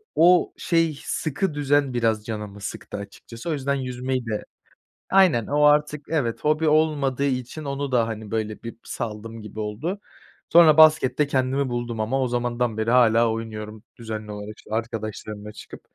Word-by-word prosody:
o 175 Hz, +2 st, +5 dB
şey, 165 Hz, -3 st, +1 dB
sıkı 155 Hz, +3 st, -2 dB
düzen 145 Hz, -2 st, +1 dB
biraz 110 Hz, -3 st, 0 dB
canımı 105 Hz, -2 st, -6 dB
sıktı 100 Hz, -, -6 dB
açıkçası, 115 Hz, +7 st, -9 dB
o -, -, +1 dB
yüzden 140 Hz, -1 st, -1 dB
yüzmeyi 130 Hz, -1 st, -3 dB
de 110 Hz, -2 st, -3 dB, 0.7 s
Aynen, 185 Hz, -, +5 dB
o 145 Hz, +1 st, +1 dB
artık, 150 Hz, 0 st, +3 dB
evet, 140 Hz, -8 st, -1 dB
hobi 155 Hz, +1 st, +2 dB
olmadığı 150 Hz, -3 st, +2 dB
için 130 Hz, +3 st, -2 dB
onu 140 Hz, -1 st, -3 dB
da, 120 Hz, -2 st, +3 dB
hani, 110 Hz, -2 st, -6 dB
böyle, 110 Hz, -1 st, -3 dB
bir 115 Hz, -1 st, -8 dB
saldım 110 Hz, +1 st, -6 dB
gibi 105 Hz, +1 st, -8 dB
oldu. 120 Hz, -, -3 dB, 0.5 s
Sonra 165 Hz, -3 st, +7 dB
baskette 150 Hz, -3 st, +6 dB
kendimi 135 Hz, 0 st, 0 dB
buldum 120 Hz, -2 st, -3 dB
ama. 120 Hz, +5 st, 0 dB
O 130 Hz, -, +1 dB
zamandan 120 Hz, -1 st, -1 dB
beri 110 Hz, +1 st, 0 dB
hâlâ 115 Hz, -2 st, +5 dB
oynuyorum 110 Hz, -1 st, -6 dB, 0.2 s
düzenli 110 Hz, -2 st, -6 dB
olarak, 105 Hz, +1 st, -8 dB
işte, -, -, -17 dB
arkadaşlarımla 110 Hz, -2 st, -5 dB
çıkıp. 105 Hz, -, -11 dB
125 Hz, 160 wpm, -24 LUFS, 110-145 Hz, 0.7 s, Sonra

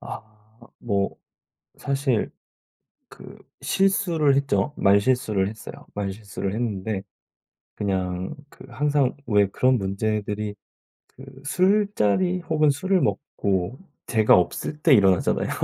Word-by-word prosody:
아 -, -, -7 dB, 0.6 s
뭐 100 Hz, -4 st, -1 dB, 0.6 s
사실 135 Hz, -4 st, -1 dB, 0.8 s
그 -, -, -13 dB, 0.2 s
실수를 170 Hz, -7 st, +2 dB
했죠. 140 Hz, +1 st, 0 dB
말실수를 100 Hz, 0 st, +2 dB
했어요. 110 Hz, +1 st, -9 dB
말실수를 100 Hz, -1 st, -4 dB
했는데 105 Hz, -3 st, -3 dB, 0.7 s
그냥 95 Hz, +1 st, -2 dB, 0.2 s
그 -, -, -14 dB
항상 140 Hz, +1 st, 0 dB
왜 105 Hz, -3 st, +3 dB
그런 130 Hz, +5 st, +2 dB
문제들이 105 Hz, +1 st, -2 dB, 0.5 s
그 130 Hz, -, -14 dB, 0.2 s
술자리 185 Hz, -, +2 dB
혹은 155 Hz, -3 st, +2 dB
술을 185 Hz, +7 st, +1 dB
먹고 100 Hz, -, -1 dB, 0.3 s
제가 110 Hz, -2 st, +4 dB
없을 90 Hz, -, -1 dB
때 150 Hz, -2 st, +5 dB
일어나잖아요. 95 Hz, -5 st, +3 dB
110 Hz, 220 characters per minute, -24 LUFS, 100-145 Hz, 0.8 s, 때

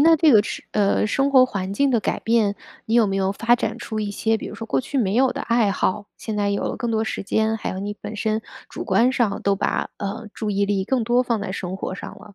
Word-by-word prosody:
那 325 Hz, +2 st, +6 dB
这 310 Hz, -1 st, +5 dB
个 215 Hz, -3 st, +7 dB
是 -, -, -6 dB
呃， 205 Hz, 0 st, +2 dB
生 275 Hz, +6 st, +1 dB
活 260 Hz, -2 st, +7 dB
环 195 Hz, -5 st, -3 dB
境 280 Hz, +6 st, +2 dB
的 235 Hz, -3 st, +2 dB
改 -, -, -1 dB
变， 225 Hz, -3 st, +2 dB, 0.3 s
你 225 Hz, -, 0 dB
有 235 Hz, -2 st, +5 dB
没 195 Hz, -1 st, -1 dB
有 195 Hz, 0 st, +1 dB
发 235 Hz, +4 st, +3 dB
展 -, -, -2 dB
出 220 Hz, -1 st, -4 dB
一 205 Hz, -1 st, -2 dB
些 220 Hz, +2 st, 0 dB
比 -, -, -7 dB
如 -, -, -7 dB
说 225 Hz, +1 st, -7 dB
过 135 Hz, -11 st, +1 dB
去 275 Hz, -, -3 dB
没 200 Hz, -4 st, +1 dB
有 255 Hz, +2 st, +3 dB
的 -, -, -5 dB
爱 230 Hz, -3 st, +2 dB
好？ 200 Hz, +1 st, -1 dB
现 220 Hz, -2 st, -5 dB
在 205 Hz, -1 st, +1 dB
有 200 Hz, -, -1 dB
了 -, -, -2 dB
更 240 Hz, -, -2 dB
多 220 Hz, 0 st, +1 dB
时 220 Hz, -, -3 dB
间， 220 Hz, +2 st, +1 dB
还 220 Hz, -, -4 dB
有 185 Hz, -, -5 dB
你 205 Hz, +1 st, -4 dB
本 215 Hz, -, -6 dB
身 215 Hz, +1 st, 0 dB, 0.3 s
主 -, -, -6 dB
观 250 Hz, +3 st, +3 dB
上 235 Hz, -6 st, 0 dB
都 200 Hz, 0 st, +2 dB
把， -, -, -1 dB
呃， 200 Hz, +2 st, -5 dB
注 215 Hz, -2 st, -3 dB
意 200 Hz, 0 st, +1 dB
力 200 Hz, -1 st, 0 dB
更 245 Hz, +1 st, 0 dB
多 240 Hz, +2 st, +3 dB
放 235 Hz, -3 st, -1 dB
在 200 Hz, -2 st, -4 dB
生 185 Hz, -1 st, -4 dB
活 190 Hz, -, -4 dB
上 -, -, -7 dB
了。 210 Hz, -2 st, -15 dB
215 Hz, 295 characters per minute, -22 LUFS, 200-235 Hz, 0.3 s, 个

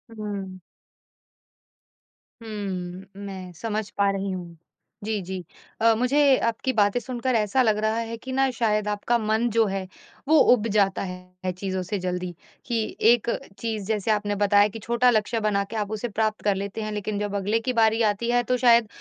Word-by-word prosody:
हुँ। 200 Hz, -3 st, -5 dB, 1.8 s
हूँ, 190 Hz, -4 st, -5 dB, 0.2 s
मैं 190 Hz, -2 st, -7 dB
समझ 215 Hz, +1 st, -3 dB
पा 200 Hz, 0 st, +3 dB
रही 195 Hz, 0 st, -2 dB
हूँ, 175 Hz, -2 st, -7 dB, 0.5 s
जी, 215 Hz, -1 st, -1 dB
जी, 185 Hz, 0 st, -5 dB, 0.4 s
अ, 225 Hz, 0 st, +6 dB
मुझे 275 Hz, +2 st, +4 dB
आपकी 230 Hz, +3 st, -1 dB
बातें 205 Hz, +2 st, +3 dB
सुनकर 250 Hz, 0 st, -2 dB
ऐसा 215 Hz, +4 st, +2 dB
लग 220 Hz, -3 st, +3 dB
रहा 215 Hz, +1 st, 0 dB
है 230 Hz, 0 st, -3 dB
कि 260 Hz, +3 st, -8 dB
ना 270 Hz, 0 st, +2 dB
शायद 215 Hz, -3 st, 0 dB
आपका 210 Hz, +3 st, +1 dB
मन 220 Hz, +2 st, +1 dB
जो 225 Hz, +1 st, +3 dB
है, 195 Hz, -1 st, -3 dB, 0.4 s
वो 315 Hz, +1 st, +5 dB, 0.2 s
उब 230 Hz, -2 st, 0 dB
जाता 195 Hz, -2 st, +2 dB
है 180 Hz, 0 st, -6 dB
चीज़ों 190 Hz, -1 st, -2 dB
से 200 Hz, +2 st, -3 dB
जल्दी, 180 Hz, 0 st, -3 dB, 0.3 s
कि 230 Hz, -3 st, -2 dB
एक 235 Hz, 0 st, +3 dB, 0.3 s
चीज 220 Hz, -2 st, -3 dB
जैसे 215 Hz, 0 st, 0 dB
आपने 205 Hz, -1 st, 0 dB
बताया 205 Hz, 0 st, +4 dB
कि 220 Hz, +2 st, -8 dB
छोटा 235 Hz, +1 st, +3 dB
लक्ष्य 225 Hz, 0 st, +1 dB
बनाके 210 Hz, 0 st, -1 dB
आप 210 Hz, 0 st, -2 dB
उसे 215 Hz, +2 st, -2 dB
प्राप्त 215 Hz, 0 st, -1 dB
कर 205 Hz, -2 st, +2 dB
लेते 200 Hz, +3 st, -4 dB
हैं, 215 Hz, 0 st, -3 dB
लेकिन 210 Hz, 0 st, -3 dB
जब 205 Hz, -1 st, -2 dB
अगले 205 Hz, +3 st, +1 dB
की 250 Hz, +2 st, -2 dB
बारी 225 Hz, 0 st, +3 dB
आती 235 Hz, +4 st, -4 dB
है 245 Hz, 0 st, +3 dB
तो 250 Hz, -, +3 dB
शायद 235 Hz, -3 st, +5 dB
215 Hz, 180 wpm, -25 LUFS, 195-230 Hz, 1.8 s, अ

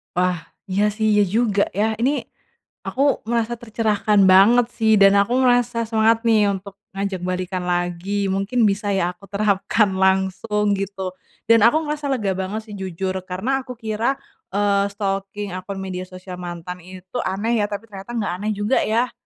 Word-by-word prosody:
Wah. 180 Hz, -1 st, +1 dB, 0.3 s
Iya 200 Hz, +2 st, +2 dB
sih, 220 Hz, 0 st, 0 dB
iya 210 Hz, 0 st, +4 dB
juga 215 Hz, -4 st, +2 dB
ya. 210 Hz, -, +3 dB
Ini 255 Hz, +4 st, +2 dB, 0.8 s
aku 265 Hz, -, -2 dB, 0.3 s
merasa 235 Hz, 0 st, 0 dB
tercerahkan 215 Hz, -2 st, +1 dB
banget 225 Hz, +6 st, +6 dB
sih 220 Hz, -1 st, +3 dB
dan 195 Hz, 0 st, +7 dB
aku 200 Hz, +4 st, +1 dB
ngerasa 245 Hz, -2 st, +2 dB
semangat 225 Hz, +1 st, +3 dB
nih 215 Hz, -2 st, +4 dB
untuk 195 Hz, 0 st, -8 dB, 0.2 s
ngajak 195 Hz, -1 st, -2 dB
balikan 185 Hz, 0 st, -2 dB
lagi. 175 Hz, +3 st, -1 dB
Mungkin 195 Hz, +6 st, -1 dB
bisa 205 Hz, +1 st, -2 dB
ya 180 Hz, -2 st, +1 dB
aku 195 Hz, -, -16 dB
terapkan 205 Hz, +1 st, +2 dB
langsung 190 Hz, +2 st, +1 dB
gitu. 195 Hz, -1 st, -4 dB, 0.4 s
Dan 230 Hz, -, +7 dB
aku 295 Hz, -, +3 dB
ngerasa 300 Hz, -1 st, -4 dB
lega 215 Hz, -7 st, 0 dB
banget 190 Hz, +3 st, -3 dB
sih, 210 Hz, -, -9 dB
jujur. 190 Hz, 0 st, -3 dB
Karena 255 Hz, +9 st, -1 dB
aku 250 Hz, -, -6 dB
kira, 225 Hz, +3 st, -1 dB, 0.4 s
eee, 200 Hz, -1 st, +2 dB
stalking 195 Hz, 0 st, -3 dB
akun 195 Hz, +2 st, -6 dB
media 185 Hz, -1 st, -5 dB
sosial 185 Hz, 0 st, -9 dB
mantan 175 Hz, 0 st, -6 dB
itu 185 Hz, +4 st, -9 dB
aneh 220 Hz, +5 st, 0 dB
ya, -, -, +2 dB
tapi 205 Hz, +2 st, -5 dB
ternyata 195 Hz, +3 st, -9 dB
nggak 205 Hz, -6 st, -1 dB
aneh 210 Hz, +2 st, -1 dB
juga 205 Hz, +5 st, +1 dB
ya. 235 Hz, +3 st, +1 dB
200 Hz, 165 wpm, -21 LUFS, 190-225 Hz, 0.8 s, dan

